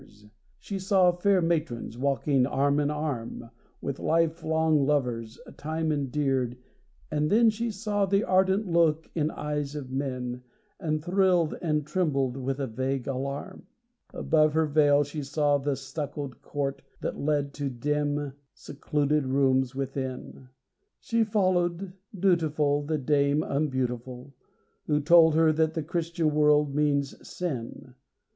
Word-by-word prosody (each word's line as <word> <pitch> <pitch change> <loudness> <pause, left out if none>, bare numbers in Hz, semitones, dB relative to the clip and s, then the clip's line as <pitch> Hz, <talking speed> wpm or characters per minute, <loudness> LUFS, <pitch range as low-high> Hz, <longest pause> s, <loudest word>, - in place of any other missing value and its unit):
She 200 -1 -6
saw 190 -2 +4
fair 180 +1 +2
matrons, 155 -9 -1
walking 135 0 +1
arm 140 +1 +1
in 145 -1 +1
arm 135 -6 -4 0.3
With 140 -1 -4
life 165 0 +1
long 160 -2 +2
lovers, 125 -6 -1 0.2
time 160 +1 -2
endeared, 135 -3 -1 0.5
and 150 0 0
then 225 +1 +5
She 230 +2 -3
saw 205 -1 -1
the 195 +2 +2
ardent 190 +3 +2
look 165 -3 +1
in 155 -2 0
eyes 150 -1 -4
of 135 -3 -6
men, 130 -2 -3 0.4
And 155 -3 -2
thrilled 180 -3 +2
and 150 -3 0
trembled 140 -7 0
with 135 +1 -3
a 140 - -1
vague 130 +2 -3
alarm. 140 +7 -5 0.4
Above 155 -1 +2
her 160 0 +3
veil 145 -1 +4
she 145 +2 -6
saw 145 0 +1
the 140 0 -1
stuccoed 140 -1 -6
court 140 -1 -3 0.2
That - - -4
led 145 -1 0
to 140 -1 -1
dim 145 +2 -2 0.2
secluded 145 0 -1
rooms 130 -1 +2
within. 130 -1 -5 0.5
She 230 -1 +1
followed, 185 -3 0 0.3
dutiful, 155 -6 +2
the 155 +2 -2
dame 140 +1 +2
unbeautiful, 130 -2 -3 0.5
Who 150 -1 +2
told 160 +1 +6
her 160 -1 +4
that 160 0 +1
the 160 - -2
Christian 165 -1 -1
world 150 -1 +3
means 140 -1 +1
sin. 130 -6 -5
150 Hz, 135 wpm, -27 LUFS, 135-165 Hz, 0.5 s, told